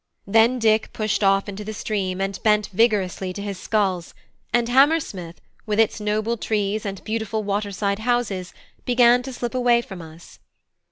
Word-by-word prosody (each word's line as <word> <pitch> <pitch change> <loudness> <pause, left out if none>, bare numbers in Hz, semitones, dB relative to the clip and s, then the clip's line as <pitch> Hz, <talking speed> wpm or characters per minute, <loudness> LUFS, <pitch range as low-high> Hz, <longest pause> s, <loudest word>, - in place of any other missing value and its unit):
Then 225 +5 +4
Dick 220 -2 +2
pushed 215 -2 -1
off 195 +1 +3
into 205 +1 -6
the 215 +1 -6
stream, 190 -3 -2
and 195 0 -2
bent 210 -2 +2
vigorously 195 -4 +1
to 200 - -6
his 200 -2 -5
sculls, 190 -6 -1 0.4
and 240 0 +2
Hammersmith, 250 - +2 0.3
with 210 0 0
its 225 0 +2
noble 215 +2 -1
trees 210 -1 -1
and 195 -1 -6
beautiful 220 0 -2
water 205 0 -2
side 200 +1 -1
houses, 220 -6 -1 0.3
began 245 0 +4
to 265 +1 -7
slip 240 -1 -4
away 245 -2 +3
from 190 -5 -9
us. 160 +1 -14
210 Hz, 165 wpm, -23 LUFS, 195-230 Hz, 0.4 s, Then